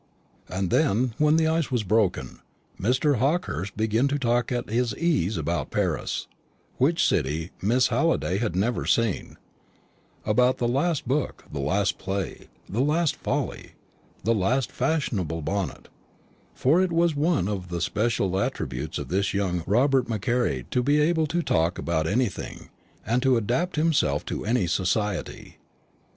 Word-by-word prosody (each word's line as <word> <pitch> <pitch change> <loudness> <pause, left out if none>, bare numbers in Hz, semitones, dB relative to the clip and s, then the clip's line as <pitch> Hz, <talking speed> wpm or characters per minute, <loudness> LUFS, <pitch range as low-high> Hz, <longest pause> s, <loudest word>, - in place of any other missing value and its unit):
And 95 -1 -2
then, 115 +4 +2
when 150 0 +4
the 160 0 +3
ice 160 -1 +1
was 120 -4 0
broken, 105 -1 0 0.4
Mr. 130 +6 +2
Hawkehurst 120 - -1
began 110 +4 +2
to 140 +1 0
talk 120 -2 0
at 125 0 -2
his 115 0 -1
ease 145 - +1
about 80 -2 -2
Paris, - - -1 0.5
which 160 +6 +3
city 80 +3 -1
Miss 120 +6 +3
Halliday 165 - +1
had 110 -7 -1
never 110 +6 0
seen; 115 -5 0 0.9
about 125 +4 +3
the 120 - 0
last 140 +4 0
book, 140 +2 -1
the 75 - -3
last 95 +8 0
play, 95 0 -4 0.2
the 105 - -3
last 155 +3 +2
folly, - - -3 0.5
the 115 - +2
last 115 +6 +1
fashionable 105 - -1
bonnet; 95 -5 -3 0.7
for 155 +8 +3
it 185 -2 +1
was 170 0 +2
one 150 - +1
of 95 -3 -3
the 85 0 -3
special 100 0 0
attributes 60 -9 -3
of - - -6
this 100 +3 0
young 90 -4 0
Robert 130 +4 +3
Macaire 110 - 0
to 125 - +2
be 145 +4 +3
able 160 +1 +2
to 170 +3 -1
talk 80 - +1
about 80 -2 -1
anything, 115 +1 -2 0.4
and 120 +2 +1
to 130 -2 +3
adapt 125 - -1
himself 150 - +1
to - - -4
any 115 -4 +2
society. 95 +3 -2
115 Hz, 150 wpm, -25 LUFS, 95-140 Hz, 0.9 s, when